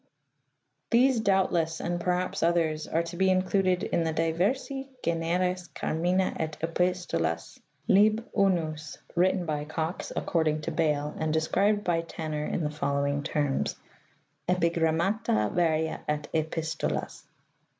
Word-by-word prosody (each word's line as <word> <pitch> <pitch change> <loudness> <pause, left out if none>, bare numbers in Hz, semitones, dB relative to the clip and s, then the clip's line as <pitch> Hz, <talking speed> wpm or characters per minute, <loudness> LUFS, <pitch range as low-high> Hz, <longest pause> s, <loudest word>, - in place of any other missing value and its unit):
These 250 +1 +4
doubtless, 185 -6 +1
and 175 0 -2
perhaps 180 +1 -1
others, 165 -2 +1
are 165 +1 +1
to 170 +1 -7
be 190 +1 +3
included 185 0 +2
in 170 - 0
the 160 - 0
"diversi 195 - 0 0.2
generis 175 +2 0
carmina 180 +4 0
et 155 -1 -3
epistolas, 165 - -1 0.3
lib. 215 +4 +4
I," 175 -6 +2 0.4
written 180 +1 +2
by 150 -2 -2
Cox, 160 +3 -3
according 155 -2 0
to - - -3
Bale, 150 -2 0
and 155 0 0
described 200 +7 +2
by 170 -3 +1
Tanner 155 -2 -4
in 170 - -1
the 150 - -1
following 140 -1 0
terms: 145 -2 -1 0.4
" 145 +1 -18
Epigrammata 170 - +1
varia 160 -2 +1
et 150 -1 -1
epistolas. 155 - -2
165 Hz, 125 wpm, -28 LUFS, 155-185 Hz, 0.4 s, These